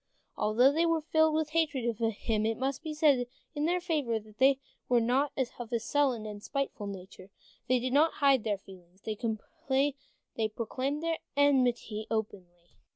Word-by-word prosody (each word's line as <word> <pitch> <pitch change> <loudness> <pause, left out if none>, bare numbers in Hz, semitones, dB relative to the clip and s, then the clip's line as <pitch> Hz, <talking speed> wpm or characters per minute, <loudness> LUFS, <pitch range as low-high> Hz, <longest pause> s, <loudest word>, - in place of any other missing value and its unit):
Although 235 +6 +4
they 330 +3 +2
were 330 -2 +1
filled 315 0 +3
with 310 -1 0
hatred 305 -6 +1
of 235 -3 -1
him, 225 -1 0
it 225 0 0
must 265 +1 -2
be 320 -1 -5
said 295 -5 +3 0.3
in 295 -1 -1
their 355 +2 +2
favor 300 -10 0
that 215 0 -18
they 270 +1 +5 0.3
were 245 -1 +5
not 255 +5 +1 0.3
of 240 -1 -6
a 235 - +1
sullen, 230 -5 0
spiteful 270 -3 -3
nature. 190 -1 -9 0.4
They 255 - +4
did 250 +1 -2
not 310 +3 +4
hide 275 -5 +3
their 210 -3 0
feelings, 185 -1 -16
they 220 +1 -2 1.1
proclaimed 260 +7 -3
their 330 -1 -1 0.2
enmity 245 -6 +2
openly. 180 -6 -4
245 Hz, 160 wpm, -30 LUFS, 215-290 Hz, 1.1 s, they